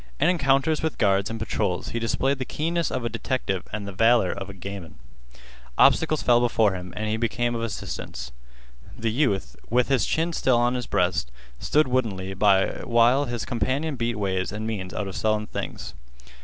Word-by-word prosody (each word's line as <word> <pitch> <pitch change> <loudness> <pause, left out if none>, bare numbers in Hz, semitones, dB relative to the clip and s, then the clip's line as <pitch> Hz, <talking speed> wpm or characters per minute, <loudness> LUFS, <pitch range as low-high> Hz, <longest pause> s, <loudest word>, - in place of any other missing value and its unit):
In - - +4
encounters 150 -2 +2
with 160 -1 -2
guards 100 -1 +2
and 115 - -4
patrols 105 -4 -2
he 115 - -3
displayed 135 +4 0
the - - -1
keenness 165 +5 -1
of 125 -2 -3
a - - +2
detective 115 -4 -2
and 105 -1 -4
the - - -5
valor 115 0 +4
of 100 -1 -6
a - - -7
gamin. 95 -2 -8 0.8
Obstacles 155 -2 +4
fell 120 -1 +5
before 115 -4 +2
him 90 -1 -6
and 110 +1 -2
became 120 +1 0
of 115 - -3
assistance. 115 -2 -5 0.7
The 115 -1 -1
youth, 100 - 0
with 125 +2 +2
his 135 -3 +2
chin 165 +2 0
still 130 -6 +2
on 120 +1 +2
his 125 -2 -3
breast, 90 -8 0 0.3
stood 155 0 +2
woodenly 105 -7 -1
by 95 0 +3
while 120 +4 +4
his 120 -3 -4
companion 135 +6 -1
beat 120 -1 -1
ways 95 -2 -1
and 105 +1 -4
means 100 -5 -4
out 105 - -3
of 95 - -6
sullen 110 0 0
things. - - -6
115 Hz, 185 wpm, -25 LUFS, 100-130 Hz, 0.8 s, fell